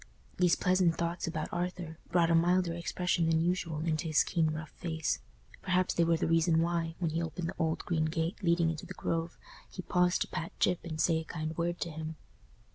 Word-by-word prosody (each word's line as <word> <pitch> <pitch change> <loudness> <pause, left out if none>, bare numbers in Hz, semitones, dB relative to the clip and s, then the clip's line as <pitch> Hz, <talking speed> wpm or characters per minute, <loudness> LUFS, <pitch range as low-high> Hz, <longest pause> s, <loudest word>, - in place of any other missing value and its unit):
These 180 -2 +4
pleasant 180 -3 +2
thoughts 170 0 -2
about 155 -2 -3
Arthur 175 -2 -3
brought 170 -1 +3
a - - +5
milder 175 +1 +3
expression 170 0 0
than 160 0 +3
usual 165 -2 0
into 160 0 -1
his 155 -2 +4
keen 165 -3 +1
rough 155 -1 -5
face: 160 -2 -2 0.4
perhaps 185 -1 +1
they 170 - +3
were 165 0 +3
the 170 - 0
reason 165 0 +3
why, 165 -1 0
when 170 -3 -1
he 165 +2 -1
opened 165 +1 -3
the - - -6
old 160 -1 0
green 160 -2 +1
gate 165 +5 -2
leading 170 -2 +3
into 155 - -7
the - - -8
Grove, 165 0 -2 0.3
he 185 - -7
paused 180 0 +2
to - - +1
pat 165 +2 -5
Gyp 180 -1 +3
and 160 -2 -5
say 165 0 +3
a - - -5
kind 160 0 -4
word 170 +1 -1
to 170 - -2
him. 155 +1 -5
165 Hz, 210 wpm, -31 LUFS, 160-175 Hz, 0.4 s, a